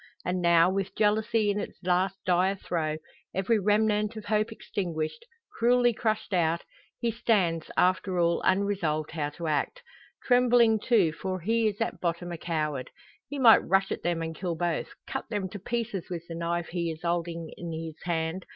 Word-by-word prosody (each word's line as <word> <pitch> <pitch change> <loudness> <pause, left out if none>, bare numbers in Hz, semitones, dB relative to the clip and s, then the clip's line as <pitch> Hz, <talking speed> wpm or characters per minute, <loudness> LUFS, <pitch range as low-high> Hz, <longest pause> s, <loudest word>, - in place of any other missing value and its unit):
And 180 0 -1
now, 170 -1 +5
with 195 +1 -2
jealousy 215 0 +2
in 205 - -1
its - - -6
last 185 +2 +1
dire 185 +2 +3
throe, 160 -5 -2 0.4
every 205 +4 +2
remnant 210 +1 +2
of 215 -1 -7
hope 215 +1 +1
extinguished 175 - -4 0.3
cruelly 245 0 +4
crushed 215 -2 -1
out 170 -1 +1 0.4
he 235 - 0
stands, 190 -8 +1
after 185 0 +2
all, 170 0 +2
unresolved 185 -6 +1
how 150 -3 -2
to 170 +3 -8
act. 160 - -1 0.4
Trembling, 245 -3 +4
too; 205 -7 +3
for 185 +3 -4
he 225 +4 +2
is 210 -1 -2
at 225 - -2
bottom 175 0 -2
a 170 - -4
coward. 150 -6 -2 0.4
He 285 - -4
might 240 -4 +8
rush 195 0 +2
at - - -3
them 170 -1 -1
and 165 0 -4
kill 175 0 -3
both 170 -1 -1 0.2
cut - - -5
them 205 -4 -2
to 205 - -7
pieces 230 -2 -3
with 170 -2 -4
the 165 - -6
knife 170 0 -2
he 170 -1 -2
is 160 +1 -7
holding 170 -1 -2
in 170 -1 -6
his 160 -1 -6
hand. 170 +1 -2
185 Hz, 180 wpm, -28 LUFS, 170-215 Hz, 0.4 s, might